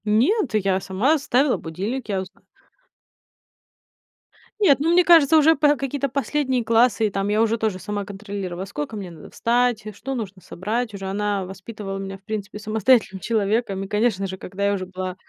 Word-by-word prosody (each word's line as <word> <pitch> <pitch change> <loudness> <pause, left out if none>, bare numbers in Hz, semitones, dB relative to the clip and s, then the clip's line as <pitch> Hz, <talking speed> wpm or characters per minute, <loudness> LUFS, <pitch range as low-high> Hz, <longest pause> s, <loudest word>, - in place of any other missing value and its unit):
Нет, 245 - +2
я 195 -2 +2
сама 210 +12 +1
ставила 265 0 +2
будильник, 205 +10 -5
я 195 -2 0
узна 185 - -12 2.2
Нет, 325 -11 +5
ну, 320 +4 +1
мне 360 +1 +5
кажется, 325 -3 +6
уже 315 +1 +6
по 295 0 +4
какие-то 275 0 -2
последние 270 -2 -1
классы, 230 -1 +3
и - - -2
там 195 0 -2
я 210 +1 +2
уже 225 0 +2
тоже 215 -4 -1
сама 205 +2 -4
контролировала, 195 -3 -6
во 190 - -3
сколько 180 +2 -5
мне 195 -4 -6
надо 170 - -12
встать, 240 -1 +1
что 270 +6 -5
нужно 200 -6 -5
собрать. 220 +7 -3
Уже 195 -1 -6
она 200 0 -1
воспитывала 195 +1 -7
меня, 195 0 -6
в 195 - -32
принципе, 210 -1 -5
самостоятельным 215 -1 +2
человеком. 210 -2 0
И, - - -6
конечно 210 -2 0
же, 190 0 -6
когда 195 +2 -4
я 200 - +2
уже 190 -2 -3
была 185 0 -5
210 Hz, 180 wpm, -23 LUFS, 195-250 Hz, 2.2 s, кажется